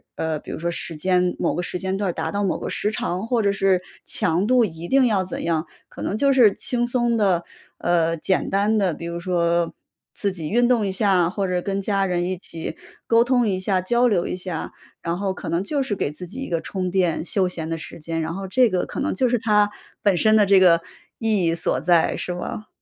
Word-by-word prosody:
呃， 160 Hz, -1 st, -2 dB
比 -, -, -13 dB
如 -, -, -4 dB
说 170 Hz, +1 st, -2 dB
时 165 Hz, -1 st, -3 dB
间 180 Hz, +2 st, +1 dB
某 -, -, 0 dB
个 175 Hz, -, -2 dB
时 180 Hz, -, -3 dB
间 190 Hz, +1 st, -2 dB
段 195 Hz, -2 st, -1 dB
儿 -, -, -2 dB
达 -, -, -3 dB
到 205 Hz, 0 st, -1 dB
某 195 Hz, -, 0 dB
个 -, -, -4 dB
时 210 Hz, -, +1 dB
长， 195 Hz, -1 st, -3 dB
或 235 Hz, -2 st, +1 dB
者 200 Hz, -, +3 dB
是 195 Hz, -2 st, +2 dB, 0.2 s
强 180 Hz, +5 st, +1 dB
度 250 Hz, -2 st, +4 dB
一 170 Hz, -2 st, -7 dB
定 270 Hz, -1 st, +4 dB
要 205 Hz, -5 st, +2 dB
怎 180 Hz, -, -5 dB
样。 165 Hz, 0 st, -1 dB, 0.2 s
可 -, -, -10 dB
能 205 Hz, -, -2 dB
就 275 Hz, +3 st, +3 dB
是 240 Hz, -6 st, +6 dB
轻 240 Hz, +2 st, -1 dB
松 240 Hz, -1 st, +1 dB
地， 190 Hz, -5 st, +2 dB, 0.3 s
呃， 165 Hz, -1 st, +1 dB
简 185 Hz, +3 st, 0 dB
单 205 Hz, +3 st, +2 dB
地， 185 Hz, -5 st, +1 dB
比 170 Hz, -, -8 dB
如 170 Hz, 0 st, -4 dB
说 170 Hz, -1 st, 0 dB, 0.4 s
自 200 Hz, -2 st, -1 dB
己 165 Hz, -5 st, -5 dB
运 240 Hz, +2 st, +3 dB
动 235 Hz, -4 st, +2 dB
一 -, -, -1 dB
下， 190 Hz, -3 st, +2 dB
或 195 Hz, 0 st, -2 dB
者 180 Hz, -1 st, 0 dB
跟 195 Hz, +1 st, -2 dB
家 195 Hz, 0 st, 0 dB
人 175 Hz, -1 st, 0 dB
一 185 Hz, +1 st, -1 dB
起 165 Hz, -2 st, -6 dB, 0.3 s
沟 230 Hz, 0 st, +4 dB
通 245 Hz, -2 st, +2 dB
一 185 Hz, -2 st, 0 dB
下、 185 Hz, 0 st, +1 dB
交 240 Hz, +6 st, +2 dB
流 190 Hz, -6 st, +1 dB
一 -, -, -3 dB
下， 180 Hz, -3 st, -5 dB, 0.3 s
然 170 Hz, +1 st, -2 dB
后 195 Hz, -1 st, -1 dB
可 -, -, -7 dB
能 170 Hz, +2 st, 0 dB
就 280 Hz, +5 st, -1 dB
是 210 Hz, -6 st, -2 dB
给 145 Hz, -, -2 dB
自 180 Hz, +4 st, -8 dB
己 200 Hz, +10 st, -9 dB
一 270 Hz, -, -5 dB
个 165 Hz, -1 st, -1 dB
充 185 Hz, -2 st, -3 dB
电、 175 Hz, -4 st, +1 dB
休 185 Hz, +1 st, +1 dB
闲 165 Hz, -3 st, -4 dB
的 165 Hz, -, -2 dB
时 165 Hz, -, -9 dB
间， 165 Hz, +1 st, -4 dB
然 160 Hz, +1 st, -3 dB
后 195 Hz, +1 st, -5 dB
这 245 Hz, +4 st, +4 dB
个 185 Hz, -2 st, 0 dB
可 -, -, -6 dB
能 300 Hz, -, 0 dB
就 255 Hz, -2 st, +1 dB
是 245 Hz, -, +2 dB
它 210 Hz, -2 st, +3 dB, 0.3 s
本 200 Hz, -3 st, +3 dB
身 215 Hz, +4 st, +4 dB
的 210 Hz, -2 st, +5 dB
这 195 Hz, -1 st, +6 dB
个 170 Hz, -2 st, +5 dB, 0.4 s
意 215 Hz, -6 st, +1 dB
义 165 Hz, -, +2 dB
所 165 Hz, -5 st, -1 dB
在， 170 Hz, 0 st, +3 dB
是 180 Hz, -, -4 dB
吧？ 210 Hz, +4 st, -6 dB
190 Hz, 265 characters per minute, -22 LUFS, 170-215 Hz, 0.4 s, 是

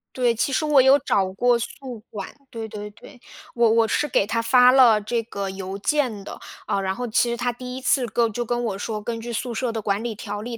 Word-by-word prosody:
对， 245 Hz, -2 st, +2 dB
其 255 Hz, -, 0 dB
实 290 Hz, +4 st, 0 dB
我 295 Hz, -3 st, +5 dB
有 270 Hz, +2 st, +6 dB
找 190 Hz, -8 st, 0 dB
过 245 Hz, +4 st, +2 dB
宿 245 Hz, -1 st, -7 dB
管， 200 Hz, -3 st, -6 dB, 0.2 s
对 225 Hz, -1 st, -6 dB
对 210 Hz, 0 st, -7 dB
对， 245 Hz, +4 st, -16 dB, 0.3 s
我 235 Hz, -1 st, +4 dB
我 225 Hz, 0 st, +3 dB
是 295 Hz, -, 0 dB
给 200 Hz, -, +2 dB
他 230 Hz, +1 st, 0 dB
发 250 Hz, +2 st, +5 dB
了 240 Hz, -5 st, +6 dB
这 230 Hz, +2 st, -2 dB
个 200 Hz, -3 st, -5 dB
邮 190 Hz, 0 st, -6 dB
件 235 Hz, -3 st, -1 dB
的， -, -, -8 dB, 0.3 s
呃， 195 Hz, -, 0 dB
然 190 Hz, 0 st, -1 dB
后 245 Hz, -, -4 dB
其 235 Hz, +1 st, +2 dB
实 235 Hz, -, -2 dB
他 245 Hz, 0 st, -1 dB
第 250 Hz, +1 st, -8 dB
1 260 Hz, -, -7 dB
次 260 Hz, 0 st, +2 dB
跟 230 Hz, 0 st, +1 dB
就 240 Hz, +3 st, -2 dB
跟 240 Hz, +1 st, -2 dB
我 200 Hz, -3 st, -2 dB
说， 210 Hz, +1 st, -4 dB
根 230 Hz, +1 st, -4 dB
据 235 Hz, +1 st, -6 dB
宿 235 Hz, +1 st, -3 dB
舍 240 Hz, +1 st, -2 dB
的 225 Hz, -1 st, -4 dB
管 205 Hz, +2 st, -1 dB
理 235 Hz, -, -3 dB
条 205 Hz, -1 st, -6 dB
例， 235 Hz, +1 st, -6 dB
230 Hz, 260 characters per minute, -23 LUFS, 210-250 Hz, 0.3 s, 有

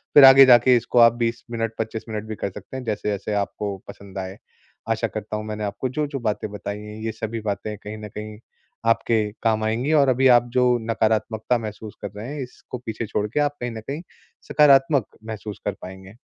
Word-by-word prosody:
फिर 145 Hz, -, +10 dB
आगे 135 Hz, 0 st, +10 dB
जाके 125 Hz, 0 st, +7 dB
इसको 120 Hz, +1 st, +1 dB
आप 115 Hz, -1 st, +8 dB
20 115 Hz, -1 st, -2 dB
मिनट 115 Hz, -1 st, -2 dB
25 110 Hz, 0 st, -3 dB
मिनट 110 Hz, -1 st, -4 dB
भी 110 Hz, -, -3 dB
कर 100 Hz, -, -3 dB
सकते 130 Hz, -, -9 dB
हैं 130 Hz, -, -6 dB
जैसे-जैसे 105 Hz, -2 st, -2 dB
आपको 100 Hz, 0 st, -2 dB
पसंद 100 Hz, -1 st, -11 dB
आए। 95 Hz, 0 st, -6 dB, 0.5 s
आशा 115 Hz, 0 st, +1 dB
करता 105 Hz, +1 st, -5 dB
हूँ 110 Hz, -, -5 dB
मैंने 105 Hz, 0 st, -4 dB
आपको 115 Hz, +5 st, -3 dB
जो-जो 145 Hz, +1 st, -2 dB
बातें 110 Hz, -2 st, -2 dB
बताई 105 Hz, 0 st, -5 dB
हैं, 105 Hz, 0 st, -9 dB
ये 110 Hz, -, -1 dB
सभी 110 Hz, +1 st, -4 dB
बातें 105 Hz, 0 st, -3 dB
कहीं 105 Hz, +1 st, -8 dB
न 105 Hz, -1 st, -8 dB
कहीं 105 Hz, 0 st, -8 dB, 0.5 s
आपके 115 Hz, -1 st, +2 dB, 0.2 s
काम 110 Hz, -1 st, +2 dB
आएँगी 120 Hz, +7 st, 0 dB
और 140 Hz, -, +3 dB
अभी 130 Hz, +1 st, +4 dB
आप 120 Hz, -, -11 dB
जो 125 Hz, -1 st, +4 dB
नकारात्मकता 110 Hz, +2 st, +1 dB
महसूस 110 Hz, -1 st, -7 dB
कर 100 Hz, -, -5 dB
रहे 120 Hz, +8 st, -6 dB
हैं, 145 Hz, -, -4 dB
इसको 125 Hz, 0 st, -9 dB
पीछे 115 Hz, +1 st, -3 dB
छोड़ 105 Hz, +1 st, -1 dB
के 115 Hz, -, -2 dB
आप 145 Hz, 0 st, 0 dB
कहीं 120 Hz, -1 st, -2 dB
न 110 Hz, -1 st, -7 dB
कहीं 145 Hz, +4 st, -4 dB, 0.5 s
सकारात्मक 140 Hz, -3 st, +5 dB, 0.2 s
महसूस 110 Hz, -2 st, -7 dB
कर 105 Hz, -, 0 dB
पाएँगे। 95 Hz, +2 st, -10 dB
110 Hz, 205 wpm, -23 LUFS, 105-125 Hz, 0.5 s, फिर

